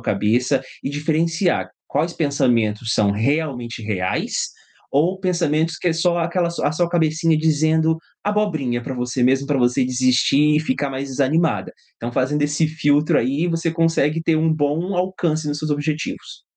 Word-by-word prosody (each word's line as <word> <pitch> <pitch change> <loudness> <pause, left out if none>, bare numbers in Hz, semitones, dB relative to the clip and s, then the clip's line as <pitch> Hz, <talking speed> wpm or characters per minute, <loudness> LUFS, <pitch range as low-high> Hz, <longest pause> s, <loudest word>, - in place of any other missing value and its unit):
cabeça 125 +5 +1 0.2
e - - -2
diferenciar 165 +5 0 0.2
quais 160 +4 -1
pensamentos 120 -7 +1
são 105 -1 +3
realmente 125 0 -1
reais, 95 -4 -2 0.4
ou 175 +7 +1
pensamentos 165 -3 0
que - - -6
é 170 - +3
só 170 +1 +1
aquela 170 +1 0
su 170 - -4
a - - +4
a - - -3
sua 170 +2 0
cabecinha 160 -1 +1
dizendo 160 +1 +2 0.3
abobrinha 155 -13 0
para 130 - -5
você 125 0 -2
mesmo 135 +2 +2
para 145 -1 0
você 125 +1 +2
desistir 130 +4 +3
e - - +3
ficar 140 -1 -2
mais 135 +1 -4
desanimada. 145 +5 0 0.2
Então, 120 +1 -5
fazendo 135 +4 0
esse 150 +2 +1
filtro 150 -1 +2
aí, 140 +8 +1
você 165 -1 -1
consegue 165 -1 +1
ter 165 0 +1
um 160 0 +2
bom 155 +5 -1
alcance 175 -4 -1
nos 145 0 -2
seus 155 -1 -3
objetivos. 150 +1 -3
150 Hz, 165 wpm, -21 LUFS, 130-165 Hz, 0.4 s, a